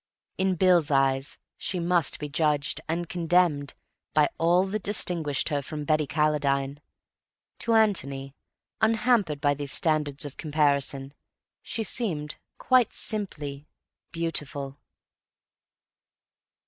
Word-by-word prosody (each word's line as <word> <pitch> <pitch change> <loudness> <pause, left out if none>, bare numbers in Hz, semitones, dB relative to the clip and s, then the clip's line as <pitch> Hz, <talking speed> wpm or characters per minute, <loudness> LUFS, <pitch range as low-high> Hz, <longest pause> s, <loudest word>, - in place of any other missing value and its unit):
In 190 -1 +2
Bill's 175 -3 +4
eyes 135 0 +3 0.2
she 185 - -3
must 170 -2 +2
be 150 - -5
judged, 150 -1 0
and 170 +1 -1
condemned, 170 -5 +1 0.4
by 150 -1 +4
all 175 +3 +3
that 205 +2 -3
distinguished 170 -9 0
her 145 -2 0
from 150 +2 -6
Betty 155 0 +1
Calladine. 140 -1 0 0.8
To 230 -1 +1
Antony, 140 -11 +1 0.5
unhampered 220 - +2
by 145 -1 +2
these 145 -1 -4
standards 150 -3 +1
of 145 - -8
comparison, 140 -3 0 0.5
she 225 - -3
seemed, 165 -11 -3 0.2
quite 255 -2 +3
simply, 150 -9 -3 0.4
beautiful. 145 -4 -3
155 Hz, 110 wpm, -26 LUFS, 145-180 Hz, 0.8 s, Bill's